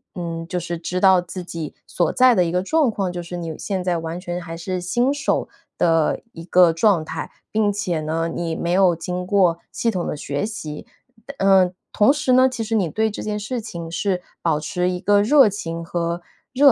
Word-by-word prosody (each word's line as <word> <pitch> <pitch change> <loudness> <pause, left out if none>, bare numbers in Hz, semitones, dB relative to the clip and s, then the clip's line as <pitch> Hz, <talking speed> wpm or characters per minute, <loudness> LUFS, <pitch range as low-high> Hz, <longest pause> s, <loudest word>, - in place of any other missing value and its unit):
嗯， 165 -1 -5
就 180 - -3
是 170 0 -4
知 180 +2 -3
道 190 -2 +6
自 180 +1 -7
己 165 -3 -6
所 175 -3 0
在 255 -1 +6
的 180 - +3
一 165 - -2
个 180 - +2
状 305 +5 +2
况， 195 -4 -2
就 175 - -5
是 175 +1 -7
你 165 -2 -5
现 190 -3 -3
在 180 -2 0
完 165 +1 -4
全 175 -1 -4
还 165 -1 -7
是 180 +2 -3
新 240 +9 +1
手 285 - -1 0.3
的 165 -2 +2
一 165 - -10
个 180 -1 +5
状 180 -2 +3
态， 160 +1 -5 0.2
并 210 -1 +2
且 180 -5 -1
呢， 165 +2 -1
你 165 -2 -2
没 170 - -2
有 185 -1 +4
经 180 +2 -4
过 185 -4 +3
系 230 - 0
统 180 -3 -2
的 - - -2
学 145 +3 -3
习。 155 -9 -6 0.4
但 280 - -9
嗯， 190 -2 +4 0.2
同 210 +6 +4
时 295 -3 0
呢， 255 +1 +6
其 245 -3 -4
实 225 +1 -4
你 195 -6 +2
对 220 +7 0
这 - - -6
件 210 0 -2
事 225 +4 -3
情 170 -6 -7
是 185 +1 -1 0.2
保 160 -3 +1
持 180 +3 -1
一 180 0 -2
个 205 0 +4
热 255 +1 +6
情 170 -4 -5
和 170 0 -2 0.3
热 280 +1 +7
180 Hz, 235 characters per minute, -22 LUFS, 170-205 Hz, 0.4 s, 热